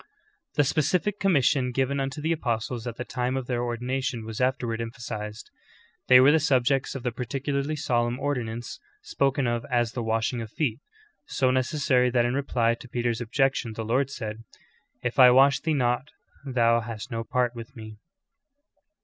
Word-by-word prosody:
"^' -, -, -25 dB
15. -, -, -37 dB, 0.5 s
The 145 Hz, -, +4 dB
specific 165 Hz, +8 st, 0 dB
commission 140 Hz, -8 st, +2 dB
given 135 Hz, +2 st, 0 dB
unto 135 Hz, +2 st, -3 dB
the 160 Hz, -, +1 dB
apostles 120 Hz, -5 st, -2 dB
at 120 Hz, -, -4 dB
the 125 Hz, -, -5 dB
time 125 Hz, +1 st, -2 dB
of 130 Hz, -, -3 dB
their 120 Hz, -1 st, -1 dB
ordination 125 Hz, 0 st, -2 dB
was 110 Hz, +2 st, -5 dB
afterward 125 Hz, -3 st, 0 dB
emphasized. 115 Hz, -2 st, -6 dB, 0.6 s
They 125 Hz, 0 st, +8 dB
were 135 Hz, +3 st, +7 dB
the 160 Hz, -, +4 dB
subjects 135 Hz, -3 st, +1 dB
of 130 Hz, -, -5 dB
the 125 Hz, -, -1 dB
particularly 140 Hz, +5 st, -2 dB
solemn 120 Hz, -3 st, 0 dB
ordinance 120 Hz, -5 st, -3 dB, 0.2 s
spoken 140 Hz, -, 0 dB
of 120 Hz, -1 st, -1 dB
as 120 Hz, -2 st, +1 dB
the 120 Hz, -, -4 dB
washing 115 Hz, +2 st, -1 dB
of 110 Hz, -, -7 dB
feet, 125 Hz, -5 st, -1 dB, 0.5 s
so 130 Hz, -1 st, +1 dB
necessary 130 Hz, -1 st, +2 dB
that 120 Hz, -1 st, +2 dB
in 120 Hz, -, 0 dB
reply 125 Hz, -4 st, +1 dB
to 120 Hz, +1 st, -10 dB
Peter's 120 Hz, -1 st, -1 dB
objection 125 Hz, -1 st, 0 dB
the 110 Hz, 0 st, -5 dB
Lord 130 Hz, +4 st, +1 dB
said: 110 Hz, -4 st, -6 dB, 0.6 s
*Tf 125 Hz, +3 st, -2 dB
I 125 Hz, -1 st, +10 dB
wash 135 Hz, +2 st, +5 dB
thee 160 Hz, -1 st, 0 dB
not 125 Hz, +1 st, 0 dB, 0.4 s
thou 115 Hz, -3 st, +3 dB
hast 115 Hz, +1 st, -7 dB
no 115 Hz, -1 st, -2 dB
part 125 Hz, 0 st, 0 dB
with 120 Hz, +3 st, -10 dB
me."' 110 Hz, -2 st, -10 dB
125 Hz, 175 wpm, -26 LUFS, 115-135 Hz, 0.6 s, I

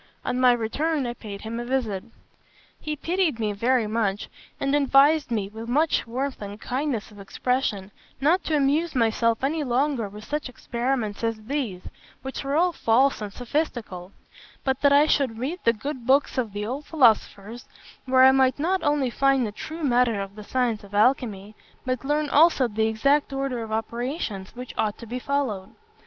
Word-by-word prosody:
On 250 Hz, -, -1 dB
my 255 Hz, -1 st, +6 dB
return, 270 Hz, +6 st, 0 dB
I 240 Hz, -, -3 dB
paid 205 Hz, -4 st, -9 dB
him 225 Hz, +1 st, -5 dB
a -, -, -3 dB
visit. 240 Hz, -6 st, -2 dB, 0.8 s
He 305 Hz, 0 st, -4 dB
pitied 335 Hz, -4 st, 0 dB
me 210 Hz, -2 st, -1 dB
very 235 Hz, +3 st, +1 dB
much, 210 Hz, -2 st, -1 dB, 0.3 s
and 275 Hz, -, 0 dB
advised 285 Hz, +1 st, +4 dB
me, 215 Hz, -4 st, -1 dB
with 220 Hz, +3 st, -8 dB
much 300 Hz, 0 st, +1 dB
warmth 260 Hz, +3 st, -3 dB
and 205 Hz, +1 st, -7 dB
kindness 255 Hz, -4 st, -3 dB
of 205 Hz, -, -14 dB
expression, 205 Hz, -1 st, -2 dB, 0.3 s
not 320 Hz, +8 st, +2 dB
to 315 Hz, -, 0 dB
amuse 295 Hz, +3 st, +1 dB
myself 230 Hz, 0 st, +1 dB
any 300 Hz, +3 st, 0 dB
longer 255 Hz, -3 st, 0 dB
with 210 Hz, +1 st, -11 dB
such 295 Hz, +1 st, -3 dB
experiments 240 Hz, -3 st, -3 dB
as 225 Hz, -1 st, -2 dB
these, 230 Hz, -8 st, -3 dB, 0.4 s
which 265 Hz, +1 st, -5 dB
were 275 Hz, +1 st, -1 dB
all 355 Hz, +3 st, +3 dB
false 260 Hz, 0 st, +2 dB
and 210 Hz, -1 st, -5 dB
sophistical; 230 Hz, -, -3 dB, 0.5 s
but 265 Hz, -1 st, -1 dB
that 285 Hz, -, +5 dB
I 285 Hz, +1 st, +6 dB
should 270 Hz, -7 st, +1 dB
read 285 Hz, +10 st, -3 dB
the 230 Hz, -, +6 dB
good 245 Hz, +2 st, -6 dB
books 275 Hz, +2 st, +3 dB
of 230 Hz, -4 st, -2 dB
the 205 Hz, +1 st, -4 dB
old 265 Hz, +6 st, -4 dB
philosophers, 230 Hz, -5 st, +2 dB, 0.4 s
where 260 Hz, 0 st, +5 dB
I 265 Hz, -, +9 dB
might 265 Hz, -1 st, +3 dB
not 360 Hz, +6 st, 0 dB
only 290 Hz, -4 st, +1 dB
find 275 Hz, 0 st, +2 dB
the 210 Hz, -, -4 dB
true 315 Hz, +10 st, -7 dB
matter 245 Hz, -5 st, +2 dB
of 195 Hz, 0 st, -5 dB
the 210 Hz, -, -9 dB
science 235 Hz, -2 st, -1 dB
of 200 Hz, 0 st, -10 dB
alchymy, 215 Hz, -3 st, +1 dB, 0.3 s
but 255 Hz, -1 st, -2 dB
learn 295 Hz, +2 st, 0 dB
also 290 Hz, -2 st, +4 dB
the 220 Hz, 0 st, 0 dB
exact 275 Hz, +7 st, +2 dB
order 270 Hz, -3 st, -2 dB
of 225 Hz, -1 st, -7 dB
operations 225 Hz, -, -4 dB
which 250 Hz, 0 st, -8 dB
ought 210 Hz, -1 st, 0 dB
to 235 Hz, -, -10 dB
be 245 Hz, +3 st, -5 dB
followed. 250 Hz, -9 st, -2 dB
250 Hz, 180 wpm, -25 LUFS, 220-280 Hz, 0.8 s, I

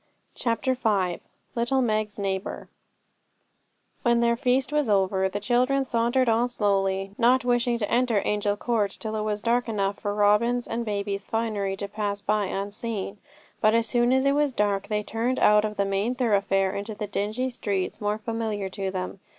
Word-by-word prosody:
CHAPTER 235 Hz, +2 st, 0 dB
V 200 Hz, -8 st, 0 dB, 0.3 s
Little 240 Hz, +3 st, +1 dB
Meg's 215 Hz, -2 st, -1 dB
Neighbour 195 Hz, -1 st, -3 dB, 1.3 s
When 235 Hz, -1 st, +3 dB
their 235 Hz, 0 st, +3 dB
feast 255 Hz, +2 st, +1 dB
was 300 Hz, -6 st, +1 dB
over, 190 Hz, -1 st, +2 dB
the 205 Hz, -, -3 dB
children 250 Hz, +5 st, +2 dB
sauntered 240 Hz, +1 st, +1 dB
on 230 Hz, +2 st, +2 dB
slowly, 195 Hz, -3 st, 0 dB
not 245 Hz, +1 st, +4 dB
wishing 245 Hz, -1 st, +2 dB
to 210 Hz, -3 st, -2 dB
enter 240 Hz, -2 st, +2 dB
Angel 205 Hz, 0 st, 0 dB
Court 220 Hz, -3 st, 0 dB
till 220 Hz, -1 st, -4 dB
it 215 Hz, -, -1 dB
was 210 Hz, -1 st, -2 dB
dark 240 Hz, +1 st, +1 dB
enough 200 Hz, -2 st, -1 dB
for 205 Hz, 0 st, -2 dB
Robin's 215 Hz, +4 st, +2 dB
and 235 Hz, +1 st, -2 dB
baby's 200 Hz, -2 st, -3 dB
finery 215 Hz, -4 st, -1 dB
to 200 Hz, -, -4 dB
pass 205 Hz, 0 st, -3 dB
by 205 Hz, 0 st, 0 dB
unseen; 200 Hz, +1 st, -4 dB, 0.4 s
but 215 Hz, +1 st, +4 dB
as 230 Hz, 0 st, +2 dB
soon 240 Hz, +1 st, +2 dB
as 265 Hz, +1 st, +3 dB
it 275 Hz, -, +4 dB
was 290 Hz, -1 st, +1 dB
dark 205 Hz, -3 st, 0 dB
they 210 Hz, 0 st, -1 dB
turned 235 Hz, +4 st, -1 dB
out 210 Hz, 0 st, +5 dB
of 210 Hz, -1 st, -3 dB
the 200 Hz, -, +2 dB
main 200 Hz, +5 st, 0 dB
thoroughfare 200 Hz, -5 st, +1 dB
into 205 Hz, +2 st, -4 dB
the 210 Hz, -, -4 dB
dingy 215 Hz, +6 st, -2 dB
streets 200 Hz, -6 st, -3 dB
more 210 Hz, 0 st, 0 dB
familiar 220 Hz, -3 st, -3 dB
to 195 Hz, 0 st, -3 dB
them. 185 Hz, +1 st, -5 dB
215 Hz, 175 wpm, -26 LUFS, 200-240 Hz, 1.3 s, out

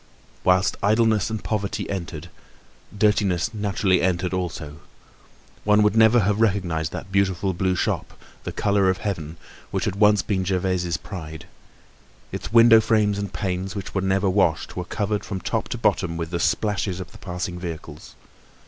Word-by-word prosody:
Whilst 90 Hz, +1 st, +3 dB
idleness 110 Hz, 0 st, +2 dB
and 110 Hz, -1 st, -4 dB
poverty 105 Hz, -1 st, -2 dB
entered, 85 Hz, -3 st, -5 dB, 0.7 s
dirtiness 105 Hz, -1 st, +2 dB
naturally 100 Hz, -3 st, +1 dB
entered 90 Hz, 0 st, 0 dB
also. 80 Hz, -4 st, -4 dB, 0.8 s
One 105 Hz, 0 st, +4 dB
would 105 Hz, 0 st, +2 dB
never 110 Hz, +1 st, +6 dB
have 105 Hz, +2 st, +1 dB
recognised 90 Hz, -7 st, 0 dB
that 95 Hz, -, -7 dB
beautiful 95 Hz, -1 st, +1 dB
blue 95 Hz, +1 st, 0 dB
shop, -, -, -2 dB, 0.2 s
the -, -, -4 dB
color 100 Hz, -2 st, +2 dB
of 95 Hz, -, +1 dB
heaven, 85 Hz, -6 st, -4 dB, 0.3 s
which -, -, -2 dB
had 95 Hz, -, -2 dB
once 105 Hz, 0 st, +4 dB
been 95 Hz, -3 st, -1 dB
Gervaise's 90 Hz, -2 st, 0 dB
pride. 80 Hz, -4 st, -8 dB, 0.9 s
Its -, -, -6 dB
window 115 Hz, -1 st, +7 dB
frames 105 Hz, -2 st, +2 dB
and 100 Hz, -1 st, -4 dB
panes, 95 Hz, +1 st, -3 dB
which 100 Hz, -2 st, -6 dB
were 95 Hz, -, 0 dB
never 95 Hz, +1 st, +1 dB
washed, 90 Hz, -5 st, +1 dB
were 90 Hz, -, -4 dB
covered 105 Hz, +1 st, -2 dB
from 95 Hz, -2 st, -4 dB
top -, -, -2 dB
to -, -, -3 dB
bottom 85 Hz, -, 0 dB
with 85 Hz, 0 st, -4 dB
the 85 Hz, -, -1 dB
splashes 100 Hz, -1 st, 0 dB
of 90 Hz, -, -8 dB
the -, -, -14 dB
passing 90 Hz, -1 st, -5 dB
vehicles. 80 Hz, -3 st, -8 dB
95 Hz, 160 wpm, -23 LUFS, 90-105 Hz, 0.9 s, window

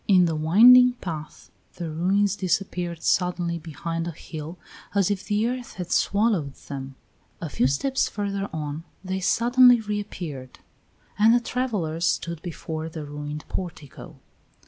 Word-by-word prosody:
In 185 Hz, -3 st, +6 dB
the 165 Hz, -2 st, 0 dB
winding 240 Hz, +11 st, +7 dB
path 160 Hz, -9 st, -8 dB, 0.2 s
the 170 Hz, -3 st, -5 dB
ruins 190 Hz, +5 st, +1 dB
disappeared 180 Hz, -3 st, -2 dB
suddenly 175 Hz, -2 st, 0 dB
behind 165 Hz, +1 st, -4 dB
a -, -, -3 dB
hill, 160 Hz, +1 st, -8 dB, 0.4 s
as 200 Hz, -1 st, +3 dB
if 200 Hz, -1 st, -2 dB
the 210 Hz, +2 st, +1 dB
earth 250 Hz, 0 st, -4 dB
had 180 Hz, -2 st, -6 dB
swallowed 200 Hz, -9 st, +1 dB
them; 135 Hz, -1 st, -6 dB, 0.4 s
a 165 Hz, -, -5 dB
few 125 Hz, -, +1 dB
steps 260 Hz, -, 0 dB
further 200 Hz, -1 st, -3 dB
on 155 Hz, 0 st, -4 dB, 0.2 s
they 190 Hz, 0 st, -3 dB
suddenly 245 Hz, +5 st, +5 dB
reappeared; 180 Hz, -, -5 dB, 0.6 s
and 225 Hz, +3 st, +6 dB
the -, -, +4 dB
travellers 205 Hz, -10 st, -2 dB
stood 170 Hz, 0 st, -2 dB
before 160 Hz, -2 st, -5 dB
the 155 Hz, -2 st, -7 dB
ruined 150 Hz, +1 st, -6 dB
portico. 165 Hz, -6 st, -7 dB
175 Hz, 140 wpm, -25 LUFS, 155-205 Hz, 0.6 s, winding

